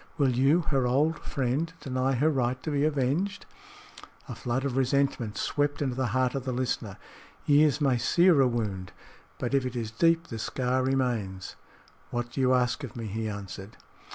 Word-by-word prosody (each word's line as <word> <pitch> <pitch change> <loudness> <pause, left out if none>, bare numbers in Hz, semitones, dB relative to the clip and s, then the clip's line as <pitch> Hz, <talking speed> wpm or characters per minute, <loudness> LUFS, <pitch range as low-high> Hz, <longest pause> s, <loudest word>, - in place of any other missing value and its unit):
Will 140 -4 +3
you, 140 +7 +4
her 135 -5 0
old 150 +5 +2
friend, 140 +4 -2
deny 130 -2 -1
her 145 +5 +2
right 130 -2 0
to 155 - -3
be 145 -1 +1
avenged?" 155 +7 0 0.8
A - - -5
flood 130 +2 -2
of 135 -3 -2
resentment 135 -4 0
swept 145 0 0
into 135 -3 -1
the 130 -1 0
heart 130 +3 +1
of 135 - -3
the 130 - -3
listener. 125 0 -2 0.5
Years 145 -1 +4
may 135 -4 +2
sear 170 +3 +4
a 130 - +5
wound; 105 -6 -3 0.4
but 125 +1 -3
if 135 -1 +3
it 125 -1 -4
is 115 -2 -3
deep, 165 +7 +2
the 115 - -5
scar 130 +3 -1
remains. 120 -8 -1 0.5
"What 120 0 -3
do 135 - -2
you 130 0 +4
ask 125 +3 0
of 125 - -7
me?" 115 -2 -5
he 110 +1 -3
answered. 100 0 -8
130 Hz, 180 wpm, -28 LUFS, 120-145 Hz, 0.8 s, a